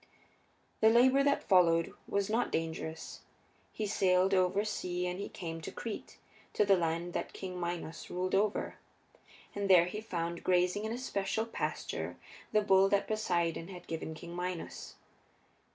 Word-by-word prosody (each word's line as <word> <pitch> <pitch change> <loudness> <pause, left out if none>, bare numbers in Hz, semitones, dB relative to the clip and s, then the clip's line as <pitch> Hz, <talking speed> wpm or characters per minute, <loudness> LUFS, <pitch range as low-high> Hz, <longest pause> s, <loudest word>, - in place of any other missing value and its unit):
The 220 - +6
labor 255 +4 +5
that 280 0 +2
followed 170 -3 +4
was 200 -1 0
not 225 +3 0
dangerous. 160 0 -4 0.5
He 215 - -3
sailed 190 -1 +3
over 190 +2 +2
sea 180 -4 -2
and 180 +1 -3
he 200 - -4
came 165 -2 -6
to - - -6
Crete, 225 -3 -6 0.4
to 210 - +3
the 195 -1 +6
land 170 0 -1
that - - -3
King 185 -2 -6
Minos 170 -2 -4
ruled 185 +1 -2
over. 205 +2 +1 0.8
And 200 -1 -2
there 180 -2 +8
he 210 +4 -5
found, 170 -5 -3
grazing 180 +3 +2
in 220 - -2
a 235 - -2
special 220 -3 -1
pasture, 230 - -4 0.3
the 215 - +4
bull 195 -1 +5
that 200 0 +2
Poseidon 170 -6 0
had 180 -2 -10
given 160 -1 -5
King 170 +2 -9
Minos. 180 -1 -5
185 Hz, 155 wpm, -32 LUFS, 170-205 Hz, 0.8 s, there